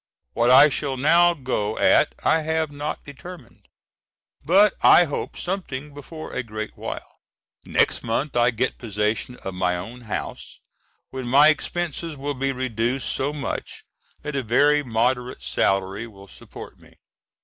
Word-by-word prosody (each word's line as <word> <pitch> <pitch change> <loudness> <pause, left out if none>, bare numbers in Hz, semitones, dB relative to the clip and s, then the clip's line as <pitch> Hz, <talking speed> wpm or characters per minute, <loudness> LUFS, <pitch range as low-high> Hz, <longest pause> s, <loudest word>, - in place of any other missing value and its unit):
What 120 +1 +2
I 135 +4 +9
shall 135 -1 -2
now 170 +5 +4
go 110 -7 -2
at - - +3
I 160 0 +3
have 160 -1 -1
not 145 +1 -5
determined, 145 -2 -12 0.8
but 195 +5 +5
I - - +7
hope 150 -4 -5
something 150 -7 -5
before 155 +3 -9
a - - -1
great 110 -2 -7
while. - - -8 0.5
Next - - +1
month 120 +5 -2
I 120 0 +4
get 125 +2 -2
possession 105 +2 -2
of 95 - -5
my 90 -1 0
own 115 +8 -8
house, 110 - -6 0.5
when 130 -2 -5
my 140 +5 +6
expenses 165 0 -2
will 145 +2 -3
be 135 0 -1
reduced 125 0 -2
so 140 +2 -1
much 145 -4 -5 0.4
that 150 -1 -5
a 135 - 0
very 145 +5 +3
moderate 125 0 -1
salary 95 +3 0
will 100 -3 -15
support - - -11
me. - - -20
130 Hz, 150 wpm, -23 LUFS, 115-150 Hz, 0.8 s, I